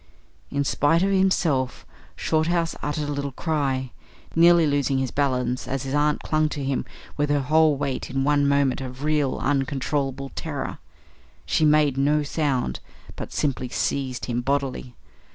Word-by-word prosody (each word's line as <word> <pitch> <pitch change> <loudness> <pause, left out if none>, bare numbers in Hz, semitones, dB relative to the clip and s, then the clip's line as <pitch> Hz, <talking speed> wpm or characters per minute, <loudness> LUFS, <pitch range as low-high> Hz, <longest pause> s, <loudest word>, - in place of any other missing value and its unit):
In 140 0 0
spite 165 +5 +2
of 195 - +2
himself, 170 -9 +1 0.3
Shorthouse 165 +1 0
uttered 150 0 -2
a - - -2
little 140 -1 -3
cry, 135 -5 -1 0.4
nearly 170 0 +6
losing 140 -2 +1
his 130 -2 -1
balance 125 -3 0
as 135 -1 -2
his 135 0 -4
aunt 150 +1 +1
clung 155 0 +1
to 145 -2 -4
him 135 -1 -1 0.3
with 145 0 0
her 145 -1 +2
whole 155 +1 +3
weight 140 -2 -3
in 135 0 -1
one 145 0 +3
moment 140 -2 +2
of 130 +1 -7
real, 150 -3 +1
uncontrollable 135 0 -1
terror. - - -4 0.7
She 155 - +2
made 150 -3 +4
no 150 +2 +2
sound, 140 - -1 0.4
but - - -7
simply 130 -3 -1
seized 130 -1 -2
him 120 -1 -1
bodily. 135 -2 -2
140 Hz, 150 wpm, -24 LUFS, 135-150 Hz, 0.7 s, nearly